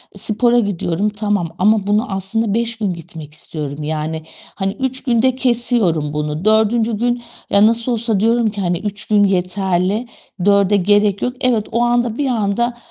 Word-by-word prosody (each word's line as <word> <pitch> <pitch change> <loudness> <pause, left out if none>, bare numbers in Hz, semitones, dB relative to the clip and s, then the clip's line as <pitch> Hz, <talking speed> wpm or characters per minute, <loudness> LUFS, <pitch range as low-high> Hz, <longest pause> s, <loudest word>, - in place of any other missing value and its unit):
e - - -11
spora 235 +4 +2
gidiyorum, 200 -1 -1
tamam 205 -5 -1
ama 205 +1 +2
bunu 210 +2 +1
aslında 200 +3 -1
5 230 0 -1
gün 200 -5 -1
gitmek 160 -2 -10
istiyorum. 150 -2 -6
Yani, 155 +1 -3 0.3
hani, 195 0 -2
3 260 0 -2
günde 250 0 +2
kesiyorum 235 - +1
bunu. 150 +4 -3
4. 220 +1 +2
gün 240 +1 -1 0.3
ya 200 +1 +5
nasıl 230 +2 +2
olsa 225 -3 0
diyorum 230 +1 +2
ki, 205 -1 -5
hani, 175 -1 0
3 205 0 -3
gün 210 -1 +3
yeterli, 190 +3 0 0.4
4'e 200 0 +4
gerek 205 +1 +2
yok. 250 - -1
Evet, 235 -5 +1
o 235 +1 0
anda 240 -1 +1
bir 285 -2 0
anda 235 +1 0
210 Hz, 165 wpm, -18 LUFS, 185-235 Hz, 0.4 s, ya